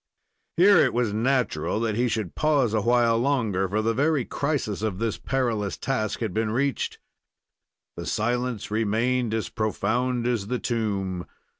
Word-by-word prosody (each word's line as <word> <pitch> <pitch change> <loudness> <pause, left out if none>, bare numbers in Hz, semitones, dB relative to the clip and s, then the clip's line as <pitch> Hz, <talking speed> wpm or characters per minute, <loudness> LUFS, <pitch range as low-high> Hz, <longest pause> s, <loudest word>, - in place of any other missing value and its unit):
Here 195 +2 +7
it - - +3
was 120 -4 +1
natural 110 - 0
that 115 -2 0
he 120 +4 +1
should 110 -5 -2
pause 145 -7 +2
awhile 115 +1 +3
longer, 115 -8 +1
for 110 +3 0
the 115 +1 +1
very 145 0 +1
crisis 140 -9 -2
of 110 -4 -2
this 115 +1 -2
perilous 115 -7 -1
task 120 -5 -2
had 110 -5 -2
been 110 +1 0
reached. 135 +5 -1 1.0
The - - -6
silence 120 -1 -1
remained 115 +3 +1
as 110 -4 -2
profound 120 +3 -1
as 120 -5 0
the 125 - -1
tomb. 100 -7 -2
115 Hz, 150 wpm, -25 LUFS, 105-125 Hz, 1.0 s, Here